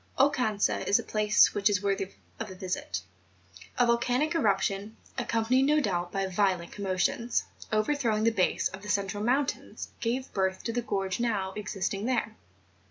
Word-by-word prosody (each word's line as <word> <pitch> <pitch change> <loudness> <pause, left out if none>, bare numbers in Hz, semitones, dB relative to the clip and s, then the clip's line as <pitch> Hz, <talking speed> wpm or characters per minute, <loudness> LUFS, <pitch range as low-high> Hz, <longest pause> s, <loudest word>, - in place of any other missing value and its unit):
Oucanca 250 -7 +2
is 200 - +6
a - - -3
place 215 0 +4
which 205 0 +3
is 200 -1 0
worthy 195 -1 0 0.3
of - - -4
a 190 - -8
visit; 180 - -3 0.8
a 245 - +5
volcanic 245 +5 +2
eruption, 205 - 0 0.2
accompanied 240 +1 +1
no 300 +3 +4
doubt 175 -9 -1
by 195 -1 -1
violent 185 -2 0
commotions, 200 +4 0 0.3
overthrowing 215 0 +1
the 230 - +4
base 185 -5 +1
of 190 - -9
the 210 - -8
central 200 0 0
mountains, 265 +4 -1
gave 250 +3 -2
birth 190 -1 0
to 230 - -2
the 245 - 0
gorge 195 -4 -2
now 205 -5 0
existing 205 -1 -3
there. 230 -4 0
210 Hz, 160 wpm, -29 LUFS, 195-235 Hz, 0.8 s, is